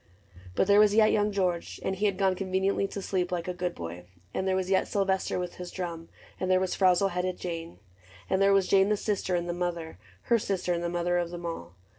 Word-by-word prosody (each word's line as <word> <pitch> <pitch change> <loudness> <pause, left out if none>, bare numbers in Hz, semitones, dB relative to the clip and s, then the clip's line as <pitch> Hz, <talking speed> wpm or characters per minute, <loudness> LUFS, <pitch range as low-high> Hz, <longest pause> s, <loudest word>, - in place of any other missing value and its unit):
But - - +3
there 200 +1 +5
was 210 -1 +5
yet 215 -1 +6
Young 210 0 +2
George 180 -4 -1
— - - -12
and 190 - 0
he 205 +2 +1
had 195 -2 -1
gone 190 -1 +3
Conveniently 190 +1 0
to 195 0 -6
sleep, 180 -2 -1
like 175 -1 -2
a 180 - -2
good 180 0 -3
boy; 85 +1 -7 0.3
And 190 - -1
there 190 - +2
was 190 0 -1
yet 190 - +3
Sylvester 190 -1 0
with 180 -1 -4
his 180 -1 -6
drum, 170 -3 -5 0.3
And 185 - -1
there 185 0 +4
was 185 -1 -1
frowzle 190 +1 +3
headed 180 0 -2
little 180 - -5
Jane 165 - -6
j 90 - -27 0.5
And 190 - +1
there 195 0 +5
was 195 -1 +3
Jane 195 0 +4
the 210 - +2
sister, 200 -3 -1
and 175 0 -1
the 175 - -1
mother, 170 - -4
— 90 - -28
Her 235 - +3
sister, 190 -3 -1
and 170 0 -2
the 170 - -1
mother 175 0 0
of 175 -1 -2
them 175 0 -7
all. 90 - -6
185 Hz, 260 wpm, -28 LUFS, 175-195 Hz, 0.5 s, yet